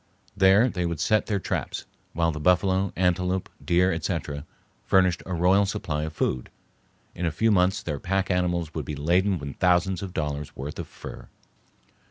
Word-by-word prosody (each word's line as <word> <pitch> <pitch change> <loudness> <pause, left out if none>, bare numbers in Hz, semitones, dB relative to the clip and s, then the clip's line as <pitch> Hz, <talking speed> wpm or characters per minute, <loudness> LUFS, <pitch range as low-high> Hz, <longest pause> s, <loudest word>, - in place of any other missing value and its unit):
There 95 +5 +5
they 90 -7 -1
would 85 -3 -3
set 105 +6 +2
their 105 - +1
traps, - - -3 0.3
while 85 0 +1
the 75 - -6
buffalo, 95 +3 +2
antelope, 90 +1 0
deer, 90 +2 +3
etc., 80 -3 -3 0.4
furnished 95 -2 +3
a 95 - -3
royal 95 +4 +4
supply 80 -7 -2
of 80 - -6
food. 65 -4 -1 0.6
In 90 - -2
a - - 0
few 110 +8 +2
months 90 -1 +2
their 75 -4 -3
pack 95 +3 -1
animals 90 -3 0
would 80 -4 -4
be 75 - -4
laden 90 +7 +2
with 70 -3 -7
thousands 90 0 +2
of 95 -2 -7
dollars' 75 -2 -3
worth 70 +3 -6
of - - -5
fur. - - -10
90 Hz, 175 wpm, -26 LUFS, 80-95 Hz, 0.6 s, There